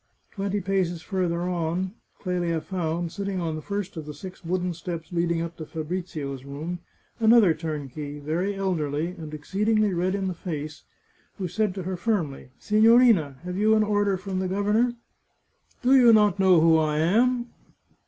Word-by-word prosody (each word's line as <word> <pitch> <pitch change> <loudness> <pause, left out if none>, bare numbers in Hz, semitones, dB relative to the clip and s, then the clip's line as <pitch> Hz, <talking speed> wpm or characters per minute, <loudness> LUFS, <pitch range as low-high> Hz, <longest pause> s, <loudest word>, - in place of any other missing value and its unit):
Twenty 200 0 -2
paces 180 -3 -1
farther 180 -3 -1
on, 180 +1 -2 0.3
Clelia 175 -3 -1
found, 170 0 -3
sitting 200 -1 -3
on 165 -2 -2
the 155 - -5
first 200 +1 -4
of 155 -2 -7
the 150 - -7
six 185 +5 -10
wooden 180 +1 -1
steps 170 -1 -6
leading 170 -1 0
up 170 0 -7
to 160 - -6
Fabrizio's 155 -5 -5
room, 155 +6 -5 0.4
another 220 -5 +6
turnkey, 150 -2 -5
very 165 +7 -2
elderly, 165 -5 -1
and 160 -4 -8
exceedingly 205 +7 0
red 180 +2 0
in 195 -1 -2
the 185 - -2
face, 155 -3 -6 0.5
who 185 - -3
said 200 +2 -1
to 190 - -4
her 185 +1 -3
firmly, 175 - -2
" - - -37
Si 215 0 +1
gnorina, 225 - +5
have 180 +1 -5
you 215 +2 +4
an 215 - +4
order 205 -2 +1
from 190 0 -4
the 190 - -1
governor? 210 +6 +1 0.3
" - - -46
" - - -38
Do 260 +2 +5
you 245 -3 +7
not 210 -3 +4
know 185 -3 +6
who 160 0 +5
I 155 -1 0
am 240 +9 +2
180 Hz, 180 wpm, -25 LUFS, 160-200 Hz, 0.5 s, you